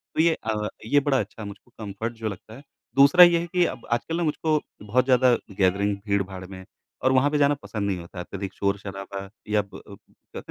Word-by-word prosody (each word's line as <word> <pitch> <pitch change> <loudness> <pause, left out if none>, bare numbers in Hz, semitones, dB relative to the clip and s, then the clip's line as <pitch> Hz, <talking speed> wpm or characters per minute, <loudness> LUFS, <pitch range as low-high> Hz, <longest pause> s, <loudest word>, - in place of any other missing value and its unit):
तो - - +3
ये 165 0 +4
अ, 105 -1 -1 0.2
ये 145 +6 +4
बड़ा 140 -2 +1
अच्छा 110 +1 -6
है 105 - -5
मुझको 100 +4 -12
कम्फ़र्ट 110 +2 -5
जो 110 -1 -3
लगता 100 +2 -10
है। 135 - -13 0.3
दूसरा 140 +6 +8
ये 175 -1 +6
है 170 - -4
कि 180 0 +2
अब 120 - -5
आजकल 120 +8 -1
ना, 175 - 0
मुझको 155 0 +1 0.2
बहुत 115 +5 +1
ज़्यादा 130 -1 +5 0.2
गैदरिंग, 100 +2 +2
भीड़-भाड़ 100 -2 -2
में 95 0 -10 0.4
और 130 - +4
वहाँ 130 +2 +4
पे 150 - +1
जाना 145 0 +4
पसंद 105 -2 -3
नहीं 95 -2 -1
होता 85 +1 -11
है, 90 - -3
अत्यधिक 95 +1 -6
शोर-शराबा 100 0 -4 0.2
या 105 0 +3
प 100 - -15
अ, - - -12 0.4
कहते - - -5
110 Hz, 225 wpm, -25 LUFS, 100-140 Hz, 0.4 s, दूसरा